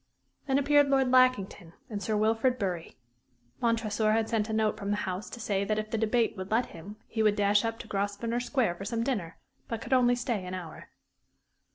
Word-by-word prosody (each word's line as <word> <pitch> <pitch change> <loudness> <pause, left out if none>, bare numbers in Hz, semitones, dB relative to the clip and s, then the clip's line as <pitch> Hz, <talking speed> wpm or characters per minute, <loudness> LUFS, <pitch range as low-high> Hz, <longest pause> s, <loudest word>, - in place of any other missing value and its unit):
Then 270 -1 +2
appeared 290 +1 +4
Lord 265 -2 +3
Lackington 230 -9 +2
and 210 -5 -5
Sir 215 +2 -1
Wilfrid 225 +4 +2
Bury. 180 -6 -4 0.6
Montresor 220 -2 +1
had 225 0 +1
sent 225 -2 0
a - - -2
note 220 -1 +1
from 200 -1 -5
the 205 - +2
House 185 +2 -4
to 240 - -9
say 200 -3 -1
that 215 +1 -1
if 215 0 -3
the 225 - 0
debate 225 +1 +1
would 190 -1 -6
let 230 +3 +2
him 185 +6 -9
he 220 - -3
would 210 -1 +4
dash 205 0 +3
up 225 0 -2
to 230 - -10
Grosvenor 205 +3 -2
Square 245 -6 0
for 195 - -7
some 230 +2 -1
dinner, 205 -10 -3 0.3
but 230 - -3
could 265 - -3
only 245 -1 +4
stay 240 -5 -2
an 180 0 -5
hour. 170 -4 -9
220 Hz, 210 wpm, -29 LUFS, 200-240 Hz, 0.6 s, appeared